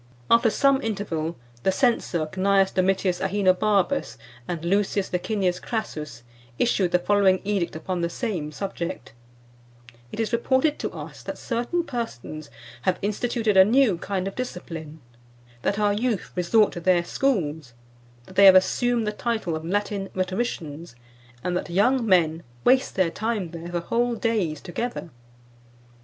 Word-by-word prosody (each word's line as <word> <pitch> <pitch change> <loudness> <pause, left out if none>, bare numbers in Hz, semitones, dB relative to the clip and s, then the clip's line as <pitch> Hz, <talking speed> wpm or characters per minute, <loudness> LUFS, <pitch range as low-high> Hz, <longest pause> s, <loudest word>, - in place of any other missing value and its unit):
'" 120 - -13
After 230 0 +6
some 275 +3 +3
interval, 175 - -3 0.2
the 190 - +2
censor 190 - +1
Cnaeus 190 +3 +2
Domitius 185 -1 +1
Aenobarbus 195 0 +1 0.3
and 170 -2 -4
Lucius 200 +1 0
Licinius 180 -1 0
Crassus 150 - -5 0.3
issued 200 -6 +2
the 180 - +3
following 190 0 +3
edict 195 -5 -1
upon 175 +3 -3
the 170 - 0
same 170 - -3
subject: 185 - -5 1.0
"It - - -7
is 225 +1 -1
reported 260 +5 +2
to - - -2
us - - -9
that - - -6
certain 245 +9 -1
persons 155 - -6 0.3
have 185 -1 +1
instituted 220 +1 0
a 190 - +9
new 220 -3 +3
kind 190 0 -2
of 195 - -4
discipline; 165 -10 -6 0.6
that 200 - 0
our 205 -1 +2
youth 220 -1 -1
resort 200 +4 +3
to - - -5
their 175 0 +3
schools; 160 - -1 0.5
that 185 - -15
they 200 - +7
have 190 -1 +10
assumed 235 +5 +3
the 210 - 0
title 220 -6 -2
of 160 - -5
Latin 200 +2 -2
Rhetoricians; 180 - -3 0.5
and 180 - -1
that 180 - -3
young 235 +8 +3
men 165 -4 +3 0.2
waste 260 +1 +3
their 185 -3 +2
time 210 -5 -2
there 170 0 -7
for 175 -1 -2
whole 235 +6 0
days 215 -9 -1
together. 190 0 -5
190 Hz, 150 wpm, -25 LUFS, 175-225 Hz, 1.0 s, have